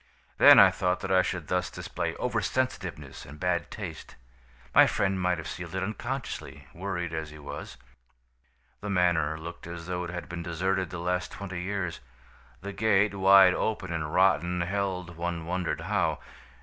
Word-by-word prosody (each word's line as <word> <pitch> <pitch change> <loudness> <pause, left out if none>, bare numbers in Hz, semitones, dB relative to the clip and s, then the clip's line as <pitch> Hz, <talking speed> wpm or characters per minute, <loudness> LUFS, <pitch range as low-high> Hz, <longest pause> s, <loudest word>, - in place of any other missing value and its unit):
Then - - +10
I - - +9
thought 90 0 -1
that 95 - -3
I 95 -1 +6
should 90 -4 -3
thus 90 0 0
display - - -4
over - - -1
sensitiveness 90 - -3
and 75 +3 -12
bad 90 -2 0
taste. 90 -7 -8 0.6
My - - +8
friend 95 -1 0
might 90 -1 +1
have 80 -1 -6
sealed 90 +2 -6
it 95 - -1
unconsciously, 110 - -5
worried 90 -2 -4
as 80 -1 -3
he 75 - -11
was. 70 -2 -8 1.0
"The 105 - -6
manor 85 -5 +2
looked 85 +1 -8
as 85 -1 -7
though 90 0 -3
it - - -6
had 90 0 -6
been 85 0 -5
deserted 90 +2 -1
the 90 - -6
last 90 +2 -2
twenty 95 -3 -6
years. 95 -3 -3 0.6
The 100 +1 -6
gate, 105 0 +3
wide 95 -1 +7
open 105 -3 -2
and 75 -2 -3
rotten, 90 -1 +3
held, 90 -2 -2
one 85 -1 -3
wondered 90 +1 -2
how. - - 0
90 Hz, 170 wpm, -28 LUFS, 85-95 Hz, 1.0 s, Then